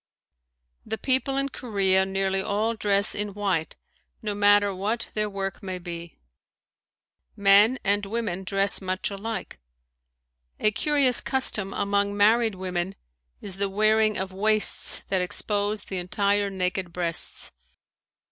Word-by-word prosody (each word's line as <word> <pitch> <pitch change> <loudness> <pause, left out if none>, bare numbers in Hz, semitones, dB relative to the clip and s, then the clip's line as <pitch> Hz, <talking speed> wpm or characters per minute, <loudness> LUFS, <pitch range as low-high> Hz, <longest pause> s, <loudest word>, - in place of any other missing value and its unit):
The 220 - -4
people 265 +2 +1
in 275 0 0
Korea 195 -7 +1
nearly 195 0 0
all 210 +4 -1
dress 200 -2 +1
in 205 -1 -3
white 190 -6 -2 0.5
no 210 -1 -1
matter 205 0 +3
what 210 +5 -3
their 210 -1 -1
work 195 0 -4
may 190 -2 -5
be. 170 -1 -8 1.2
Men 200 +5 +5
and 205 +1 +1
women 205 -4 -3
dress 195 +1 +1
much 185 +1 -2
alike. 200 - -6 1.0
A 215 - +3
curious 275 +1 +2
custom 215 -7 +1
among 200 0 -1
married 220 +1 +3
women 185 0 -3 0.5
is 195 -2 -5
the 200 0 0
wearing 215 +1 +2
of 190 0 -4
waists 215 +2 +2
that 190 -2 +1
expose 205 +3 -1
the 190 - -5
entire 200 +3 0
naked 185 -1 -2
breasts. 170 -1 0
200 Hz, 130 wpm, -25 LUFS, 190-215 Hz, 1.2 s, Men